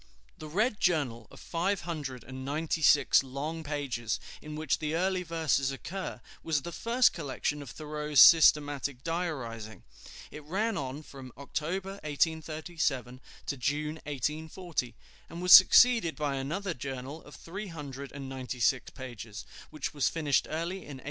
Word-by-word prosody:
The 155 - -7
Red 210 +8 0
Journal 135 - 0
of - - -14
five 185 +4 -1
hundred 145 -8 -5
and 130 +1 -8
ninety 155 +4 -2
six 150 0 +5
long 145 +5 -5
pages, 135 -7 -2 0.2
in 150 0 -8
which 155 -2 0
the 155 0 -2
early 185 +2 +1
verses 160 -6 0
occur, 175 0 -6 0.2
was 150 -4 -1
the 170 - -5
first 235 +6 +3
collection 145 -1 -3
of 140 - -9
Thoreau's 150 -1 -1
systematic 145 -3 +6
diarizing. 130 -11 -4 0.5
It 150 - -9
ran 205 +8 -1
on 140 -1 -4
from 135 -3 -11
October, 185 +7 -4
1837, 155 -4 -1 0.2
to 140 - -3
June, 150 +5 -2
1840, 150 0 -3 0.3
and 170 - -8
was 180 0 +6
succeeded 225 -2 +8
by 145 -2 -1
another 170 +8 -3
journal 135 +2 -6
of 145 - -13
three 195 +5 -7
hundred 140 -5 -7
and 140 -1 -7
ninety 130 -1 -6
six 120 +1 +2
pages, 120 -5 -8 0.2
which 155 -3 -5
was 145 -2 +1
finished 150 -4 +1
early 170 +4 -2
in 150 -7 -9
1841. - - -12
150 Hz, 150 wpm, -30 LUFS, 135-165 Hz, 0.5 s, succeeded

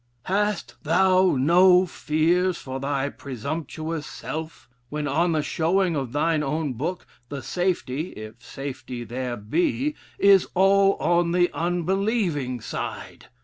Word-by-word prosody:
'Hast 205 +1 -1
thou 185 +2 +3
no 180 +6 +5
fears 170 +3 +1
for 130 0 -6
thy 140 0 -1
presumptuous 155 +4 -5
self?' 160 +1 -7 0.2
when 150 0 -3
on 165 +4 +1
the 155 -2 +1
showing 175 +3 +1
of 135 -5 -3
thine 155 +3 +1
own 150 -1 -1
book, 165 +9 -4 0.2
the 140 -2 -6
safety 175 -5 -1
(if 110 +3 -10
safety 130 -2 -6
there 120 +1 -4
be) 175 - 0 0.2
is 195 -2 +5
all 195 +1 +4
on 170 0 +1
the 175 0 +3
unbelieving 175 - -1
side? - - -6
160 Hz, 125 wpm, -24 LUFS, 140-180 Hz, 0.2 s, no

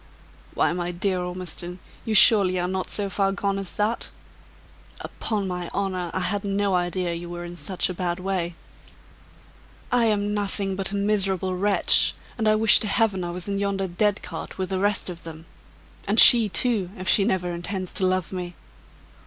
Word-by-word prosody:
"Why, - - +1
my 175 0 -3
dear 185 +1 -1
Ormiston, 180 0 -5 0.3
you 220 - -1
surely 190 -3 +6
are 175 - -1
not 185 0 -3
so 205 -1 +2
far 195 0 0
gone 195 0 -2
as 195 -2 -4
that? 215 +3 -1 0.9
Upon 210 -3 -3
my 180 -2 -5
honor, 185 -3 -2
I 185 - -3
had 200 +3 -2
no 200 0 -1
idea 175 0 -1
you 170 +1 -7
were 175 0 -6
in 175 0 -9
such 185 +1 -1
a 185 - -4
bad 175 -1 -3
way." 180 -2 -3 1.4
"I 245 -1 +3
am 205 -1 0
nothing 200 -1 -2
but 195 0 -2
a - - -3
miserable 195 -2 0
wretch! 200 +2 +3 0.2
and 220 -2 -1
I 215 - +4
wish 215 0 +6
to 215 - -2
Heaven 205 -3 +1
I 175 - -4
was 175 +1 -6
in 200 0 -2
yonder 200 -1 -1
dead 205 +3 -1
cart, - - -8
with 185 -1 -3
the 190 -1 -2
rest 205 0 0
of 175 -2 -7
them 160 0 -10 0.6
and 210 +3 +2
she, 230 -3 +9
too, 210 -4 0
if 185 - -7
she 200 - +4
never 185 -4 -1
intends 185 +2 -5
to 190 - 0
love 185 -2 -1
me!" 180 -1 -6
190 Hz, 185 wpm, -24 LUFS, 180-205 Hz, 1.4 s, she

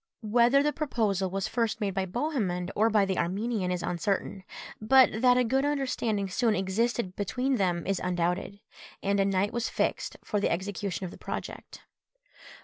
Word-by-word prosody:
Whether 240 +5 +4
the 295 0 +1
proposal 215 - 0
was 195 +1 -2
first 230 -2 -1
made 200 -3 -1
by 190 0 -1
Bohemund 195 - -2
or 220 +2 +3
by 210 -2 +3
the 190 -1 -1
Armenian 200 +2 -1
is 180 -1 -2
uncertain, 190 +2 -2 0.4
but 240 0 +5
that 250 -1 +5
a 250 - +4
good 265 +3 +1
understanding 255 -8 -1
soon 215 +3 +1
existed 195 +1 -1
between 250 +6 -1
them 175 -4 0
is 195 -1 -1
undoubted; 180 +2 -1 0.4
and 200 0 +1
a 195 - +3
night 195 +1 0
was 235 -1 -1
fixed - - -2
for 210 - -1
the 200 - +1
execution 195 +1 -3
of 175 - -6
the - - -13
project. - - -7
205 Hz, 170 wpm, -28 LUFS, 190-240 Hz, 0.4 s, but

